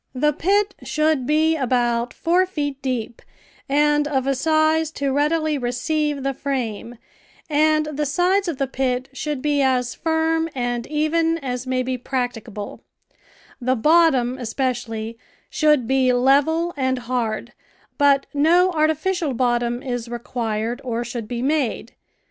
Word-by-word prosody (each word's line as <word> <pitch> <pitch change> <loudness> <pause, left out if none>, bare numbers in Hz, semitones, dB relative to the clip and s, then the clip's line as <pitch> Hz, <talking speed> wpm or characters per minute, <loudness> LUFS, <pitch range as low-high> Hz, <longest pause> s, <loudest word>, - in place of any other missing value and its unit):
The 300 +3 +2
pit 400 +6 +1
should 305 -4 0
be 315 +2 +3
about 245 -3 0
four 360 +3 +1
feet 290 -6 -4
deep 245 -3 -3 0.5
and 295 +1 +3
of 265 -3 0
a 275 - +2
size 315 +2 +2
to 280 -1 -1
readily 305 +1 +1
receive 280 +4 -1
the 275 0 0
frame, 245 -4 -4 0.6
and 310 +1 +3
the 300 -1 -2
sides 365 +6 +1
of 330 -5 -2
the 275 - 0
pit 260 0 -2
should 290 -1 -4
be 290 -1 +2
as 255 -2 +1
firm 325 0 0
and 245 -2 -2
even 325 +2 +1
as 255 -4 -4
may 255 0 0
be 255 0 -3
practicable; 240 -5 -4 0.8
the 255 +1 +1
bottom, 265 -3 +3
especially, 230 -2 -3 0.3
should 300 -5 +3
be 260 0 +2
level 285 +7 +2
and 260 -2 0
hard, 240 -1 -2 0.5
but 280 -1 +4
no 340 +6 +4
artificial 315 -1 0
bottom 240 0 0
is 245 -3 -4
required 235 -1 -3
or 240 -2 -2
should 235 -2 -6
be 240 +1 -4
made. 275 -5 -1
270 Hz, 135 wpm, -22 LUFS, 245-310 Hz, 0.8 s, but